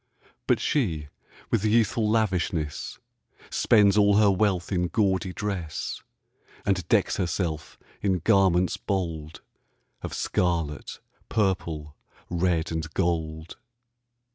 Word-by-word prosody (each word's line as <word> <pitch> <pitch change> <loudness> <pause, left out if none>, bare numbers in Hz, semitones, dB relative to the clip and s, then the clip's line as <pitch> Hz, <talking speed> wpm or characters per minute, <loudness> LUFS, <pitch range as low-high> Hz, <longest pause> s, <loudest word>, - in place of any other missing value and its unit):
But - - +3
she, 80 - -1 0.4
with 110 -3 +2
youthful 110 0 +2
lavishness, 90 -8 -1 0.5
Spends 105 -3 +4
all 100 0 +5
her 105 -2 +5
wealth 95 -2 0
in 90 -2 +1
gaudy 95 -1 +1
dress, 90 -6 -4 0.6
And 95 -4 0
decks - - +2
herself 85 -3 -2 0.2
in 95 -2 +1
garments 90 -1 +3
bold 85 -6 -4 0.6
Of - - -5
scarlet, 85 -5 -1 0.3
purple, 85 -8 -1 0.4
red, 85 -2 0
and 80 0 -3
gold. 80 -3 -2
90 Hz, 100 wpm, -26 LUFS, 80-100 Hz, 0.6 s, all